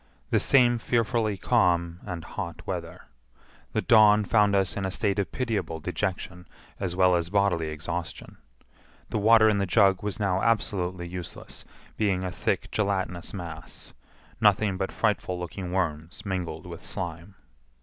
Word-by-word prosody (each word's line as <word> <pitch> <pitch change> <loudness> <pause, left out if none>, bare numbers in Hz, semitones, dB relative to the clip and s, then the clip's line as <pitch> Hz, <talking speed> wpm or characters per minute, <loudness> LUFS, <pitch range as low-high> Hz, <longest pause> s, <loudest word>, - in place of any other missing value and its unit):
The - - +4
same 120 -3 +4
fearfully 115 -3 0
calm 90 -6 +1
and 85 -3 -5
hot - - -6
weather. - - -5 0.7
The - - +1
dawn 105 -2 +6
found 105 -1 +3
us 95 -2 +1
in 100 - -3
a 95 - -1
state 100 +1 0
of 100 - -2
pitiable 110 -10 -2
dejection 90 +2 -4 0.3
as 90 -3 -2
well 90 -1 +4
as 85 -1 -1
bodily 100 -5 +1
exhaustion. 80 +3 -6 0.7
The 110 - 0
water 110 +1 +6
in 105 -2 +3
the 100 - 0
jug 95 -2 +4
was 105 0 -3
now 95 -2 +1
absolutely 95 -6 0
useless, 90 0 -8 0.3
being 100 -4 +1
a 90 - -3
thick - - -2
gelatinous 95 -5 -1
mass; 85 -4 -8 0.5
nothing 105 -1 +3
but 95 0 -3
frightful 105 -4 0
looking 90 +1 -6
worms 85 -2 -3
mingled 90 -3 -4
with 85 -2 -9
slime. 85 0 -5
95 Hz, 150 wpm, -27 LUFS, 90-105 Hz, 0.7 s, dawn